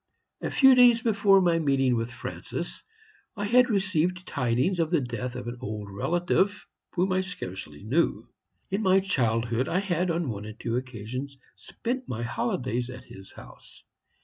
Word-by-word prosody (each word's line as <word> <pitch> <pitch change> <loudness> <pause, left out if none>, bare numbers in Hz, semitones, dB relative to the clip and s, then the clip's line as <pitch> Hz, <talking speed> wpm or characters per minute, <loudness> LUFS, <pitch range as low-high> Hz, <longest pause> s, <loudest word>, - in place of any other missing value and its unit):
"A - - -2
few 265 -1 +6
days 245 -2 +6
before 200 -4 +4
my 170 -2 +3
meeting 135 -4 +2
with 115 0 -2
Francis, 120 - -6 0.5
I 205 -1 -3
had 250 +4 +5
received 185 -3 0
tidings 130 +6 0
of 165 -2 +1
the 170 -2 +3
death 125 -1 -4
of 125 -1 -6
an 120 +1 -5
old 105 -1 -5
relative, 175 - 0 0.3
whom 185 +1 +1
I 185 0 +2
scarcely 95 - -7
knew. 140 +11 0 0.4
In 195 +3 0
my 190 -2 +4
childhood 120 -8 0
I 175 - +1
had, 185 -2 0
on 170 -1 0
one 105 -1 -5
or 110 - -7
two 115 +2 -3
occasions, 130 +2 -5 0.2
spent 255 +2 -5
my 120 0 -3
holidays 120 +1 -2
at 125 0 -9
his 95 -5 -13
house. - - -14
145 Hz, 165 wpm, -27 LUFS, 120-190 Hz, 0.5 s, few